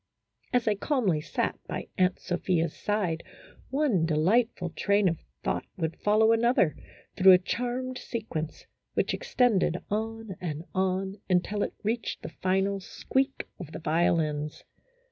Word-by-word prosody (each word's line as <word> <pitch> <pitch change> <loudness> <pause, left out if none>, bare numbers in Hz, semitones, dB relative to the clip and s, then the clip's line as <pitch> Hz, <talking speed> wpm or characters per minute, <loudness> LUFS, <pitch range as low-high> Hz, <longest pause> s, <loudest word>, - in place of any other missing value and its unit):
As 245 -2 +3
I - - +5
sat 205 - -2
calmly 205 - +1 0.4
by - - -4
Aunt 185 0 +2
Sophia's 175 -2 0
side, 195 -6 -1 0.5
one 265 - +2
delightful 180 +3 +2
train 200 +2 +2
of 165 -2 0 0.2
thought - - -1
would 165 -2 -2
follow 215 +2 +4
another, 230 -7 +3 0.4
through 190 0 +8
a - - +9
charmed 250 +6 -3
sequence, 165 -10 -5 0.3
which - - +1
extended 245 - +2
on 220 -2 -3
and 160 -3 -3
on 190 +1 0
until 190 +3 +1
it - - -2
reached 225 +2 -2
the - - -5
final 195 +3 0
squeak 265 +8 -1
of 160 -4 -8
the - - -5
violins. 155 -2 0
190 Hz, 135 wpm, -28 LUFS, 170-225 Hz, 0.5 s, a